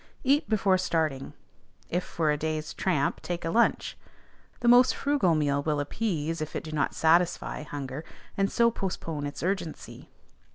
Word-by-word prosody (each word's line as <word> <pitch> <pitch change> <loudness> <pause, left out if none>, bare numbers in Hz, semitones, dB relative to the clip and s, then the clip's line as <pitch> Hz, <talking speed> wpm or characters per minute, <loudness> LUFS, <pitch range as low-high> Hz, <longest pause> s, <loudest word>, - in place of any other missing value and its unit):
Eat 285 +3 +2
before 195 -3 +3
starting; 155 -7 -1 0.5
if 180 +1 -1
for 160 -2 0
a - - +2
day's 155 0 -3
tramp, 160 -7 0
take 175 -1 -4
a 165 - -1
lunch; 235 +4 +2 0.7
the 240 - 0
most 245 +1 +6
frugal 275 - +2
meal 145 -2 +1
will 150 0 0
appease 165 -1 -2
if 155 - -5
it - - -3
do 155 - -7
not 150 -2 -1
satisfy 170 +1 +2
hunger, 145 -1 -6 0.3
and 195 0 +1
so 235 -1 +3
postpone 165 -8 -4
its 145 - -7
urgency. 180 -3 -4
165 Hz, 160 wpm, -28 LUFS, 150-195 Hz, 0.7 s, most